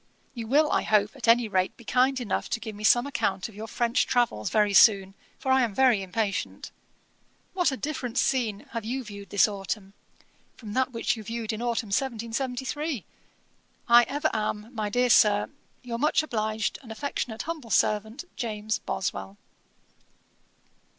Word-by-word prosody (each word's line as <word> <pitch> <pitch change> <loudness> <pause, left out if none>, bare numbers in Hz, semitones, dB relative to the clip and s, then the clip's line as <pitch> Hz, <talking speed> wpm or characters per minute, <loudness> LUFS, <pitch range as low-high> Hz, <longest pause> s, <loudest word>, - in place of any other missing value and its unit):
You 230 -3 -6
will, 300 +5 +3
I - - +2
hope, 210 +2 +2
at 255 -3 -5
any 230 0 +5
rate 185 -3 0
be 235 - -14
kind 260 +3 +2
enough 230 -6 -2
to - - -1
give 220 -1 -7
me 210 - -9
some 240 +4 +5
account 195 -9 -1
of 220 - -14
your 215 +2 -7
French 235 +2 +1
travels 235 - +1
very 210 -2 +2
soon, 195 -2 +6 0.2
for 265 -4 -2
I 265 0 +5
am 225 -5 -1
very 255 -6 +4
impatient. 200 +2 -3 0.8
What 355 -5 +2
a 265 - -3
different 260 -5 -4
scene 230 -8 +1
have 230 -2 -4
you 255 +4 -3
viewed 200 -3 -10
this 200 -4 +4
autumn, 195 -1 -5 0.6
from 215 -4 -8
that 260 +1 +1
which 230 0 -1
you 220 - -8
viewed 225 +1 -4
in 220 - -5
autumn 235 -2 -1
1773! 260 - -2 0.8
I 235 0 +8
ever 295 +3 -1
am, 215 +1 -3
my 215 -3 -2
dear 245 +3 +2
Sir, 205 -1 +4 0.3
'Your 235 -2 -4
much 300 +2 +2
obliged 220 -5 -2
and 235 -5 -11
'Affectionate 225 -2 -4
humble 315 -7 -6
servant, 215 - +1
'JAMES 220 -3 -3
BOSWELL.' 95 - -4
230 Hz, 165 wpm, -27 LUFS, 210-255 Hz, 0.8 s, I